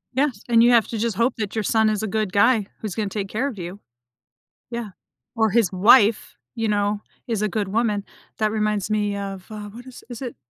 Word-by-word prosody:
Yes, 265 -6 0
and 230 -1 +5
you 240 - +6
have 230 -2 +4
to 230 - -3
just 225 -2 -1
hope 235 +3 +2
that 215 -1 -4
your 220 - 0
son 220 0 +3
is 215 0 -1
a - - -1
good 215 -1 -1
guy, 215 0 +3
who's 210 -4 -4
gonna 210 -3 -2
take 200 -1 -3
care 255 +6 -1
of 235 -7 -6
you. 180 +3 -7 0.9
Yeah. 235 -3 -4 0.5
Or 220 -1 +3
his 215 -3 +2
wife, 210 +3 +4 0.2
you 225 -1 -1
know, 205 0 0 0.3
is 225 -3 -1
a 215 - +2
good 205 -1 -2
woman. 210 -2 0 0.3
That 215 -1 +1
reminds 210 -2 -1
me 205 -1 0
of, 195 -2 -6
uh, 210 -1 -7
what 240 +4 -12
is 255 - -12
is 240 +2 -8
it? 250 - -5
215 Hz, 225 wpm, -23 LUFS, 205-230 Hz, 0.9 s, you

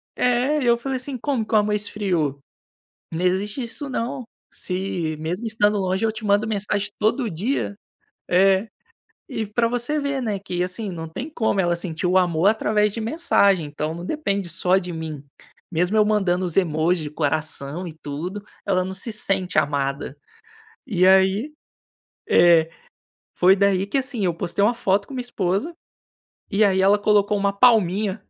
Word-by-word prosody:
É, 250 +5 +1
e - - -1
eu 235 0 +4
falei 265 +2 -3
assim: 255 0 -5
"Como 245 -4 -1
que - - -8
o - - +7
amor 210 0 +2
esfriou? 185 -9 -1 0.7
Não 170 +3 -2
existe 200 +7 0
isso 275 +5 -5
não. 250 +2 -3 0.3
Se, 180 -4 -3
mesmo 180 +9 -3
estando 210 -1 +2
longe, 190 +3 0
eu 220 - +1
te 215 0 -9
mando 205 +2 +2
mensagem 205 -1 -1
todo 220 +2 +1
dia". 205 - -2 0.5
É, 190 +3 +4 0.6
e 220 - -3
para 230 +3 +1
você 245 +5 -1
ver, 280 -2 -2
né, 210 -4 -1
que, 180 -2 -4
assim, 190 +2 -4
não 165 -2 -6
tem 255 - -6
como 220 -8 0
ela 175 -1 +1
sentir 170 -1 -4
o 180 +1 +3
amor 175 0 +2
através 210 -1 +1
de 230 - -4
mensagem, 210 - +2
então 150 +2 -4
não 175 +1 -7
depende 200 - -2
só 180 +2 +2
de 180 -2 -4
mim. 155 -3 -6 0.5
Mesmo 180 +6 +1
eu 210 - +5
mandando 190 -4 +1
os 175 +1 -2
emoji 165 -1 +1
de 150 - -5
coração 155 +2 -2
e 160 - -8
tudo, 175 +8 -5 0.2
ela 185 -2 +1
não 190 - -5
se 210 +4 -3
sente 195 -4 -1
amada. 140 -1 -1 0.7
E 185 -6 +2
aí, 190 +9 +4 0.8
é 165 -2 +5 0.7
foi 185 +2 +5
daí, 195 -1 +2
que, 275 - -1
assim, 260 -5 -2
eu 175 - +1
postei 175 +4 -2
uma 235 +4 +4
foto 200 -3 0
com 275 - -10
minha 255 - -4
esposa, 210 - -2 0.8
e 210 +1 +3
aí 190 -2 +3
ela 200 +2 +5
colocou 205 0 +2
uma 200 0 +1
palminha, 205 -2 +3
200 Hz, 175 wpm, -22 LUFS, 180-220 Hz, 0.8 s, o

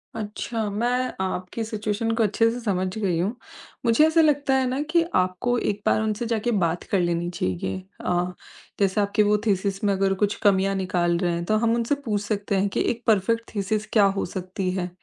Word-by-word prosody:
अच्छा, 215 +1 -3
मैं 245 +5 0
आपकी 185 +3 -3
सिचुएशन 215 0 -2
को 225 - +2
अच्छे 220 +2 +3
से 240 - -5
समझ 190 -5 -1
गई 190 -6 0
हूँ, 200 +7 -1 0.5
मुझे 230 +6 +5
ऐसा 320 +1 +4
लगता 290 -3 +2
है 265 -1 +2
ना 260 +3 -1
कि 340 0 +4
आपको 185 +7 +1
एक 205 -3 -1
बार - - +3
उनसे 220 +2 -1
जाके 230 +1 0
बात 170 +1 -1
कर 195 - +3
लेनी 175 0 0
चाहिए। 95 - -2 0.3
अ, 180 0 0 0.5
जैसे 200 +1 +2
आपकी 205 +1 +2
वो 210 0 +3
थीसिस 195 -1 0
में 200 -1 +3
अगर 195 0 +1
कुछ 205 0 +1
कमियाँ 195 -1 +3
निकाल 175 -2 0
रहे 175 0 0
हैं। 170 0 -2
तो 215 +4 +2
हम 230 +1 +2
उनसे 235 +4 0
पूछ 210 -3 0
सकते 205 0 -2
हैं 195 +1 +1
कि - - -1
एक 235 0 -7
परफेक्ट 230 +2 +2
थीसिस 210 +1 -1
क्या 210 -3 +6
हो 195 0 0
सकती 185 +1 -4
है। 180 -1 -2
205 Hz, 205 wpm, -24 LUFS, 185-230 Hz, 0.5 s, क्या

